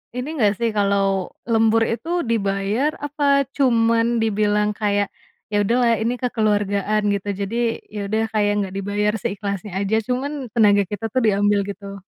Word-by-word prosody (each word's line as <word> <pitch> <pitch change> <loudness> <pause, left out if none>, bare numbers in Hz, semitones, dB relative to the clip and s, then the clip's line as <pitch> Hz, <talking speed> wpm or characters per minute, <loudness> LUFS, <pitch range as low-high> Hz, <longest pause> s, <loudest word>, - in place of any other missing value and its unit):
ini 275 +6 -4
nggak 210 -7 +3
sih 235 - +1
kalau 195 -2 +1 0.2
lembur 225 0 +3
itu 240 +8 -4 0.2
dibayar 210 +5 0
apa 290 +1 -4 0.3
cuman 230 -3 +2
dibilang 210 -1 +1
kayak, 205 -1 0 0.4
"Ya 205 - +2
udahlah 235 +2 +3
ini 235 +2 0
kekeluargaan 210 -3 0
gitu?" 200 0 -6
Jadi 200 +3 -3 0.4
ya 210 - -4
udah 220 +2 0
kayak 205 -1 +2
nggak 190 -1 -6
dibayar 205 +1 0
seikhlasnya 200 0 -4
aja, 200 +2 0
cuman 255 +3 -1 0.2
tenaga 205 -3 +5
kita 215 +2 -3
tuh 255 - +3
diambil 205 -1 +3
gitu. 200 0 -7
210 Hz, 150 wpm, -21 LUFS, 200-230 Hz, 0.4 s, tenaga